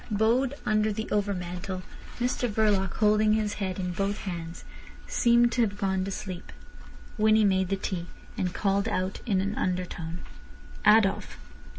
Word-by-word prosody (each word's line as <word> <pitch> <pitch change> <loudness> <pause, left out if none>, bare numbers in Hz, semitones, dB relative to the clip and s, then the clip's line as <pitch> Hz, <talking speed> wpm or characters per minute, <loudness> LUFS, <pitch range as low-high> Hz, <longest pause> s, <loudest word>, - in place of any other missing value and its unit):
Bowed 235 +6 +2
under 215 0 +2
the 220 +1 -3
overmantel, 185 -2 -2 0.4
Mr 245 0 0
Verloc, 205 -4 +2
holding 215 0 +4
his 215 -1 0
head 190 -2 -2
in 180 -1 -2
both 195 +3 -1
hands, 170 -3 -6 0.4
seemed 235 0 +3
to 240 - +1
have 205 -3 0
gone 190 -2 0
to 195 - -3
sleep. 185 -2 -6 0.7
Winnie 215 0 +5
made 190 -2 +2
the 195 - +1
tea, 185 -2 -4 0.3
and 180 - -1
called 200 +2 0
out 185 -1 -2
in 195 -4 +2
an 200 +2 -2
undertone: 180 -3 -3 0.7
"Adolf." 210 -2 +4
200 Hz, 150 wpm, -27 LUFS, 185-215 Hz, 0.7 s, Winnie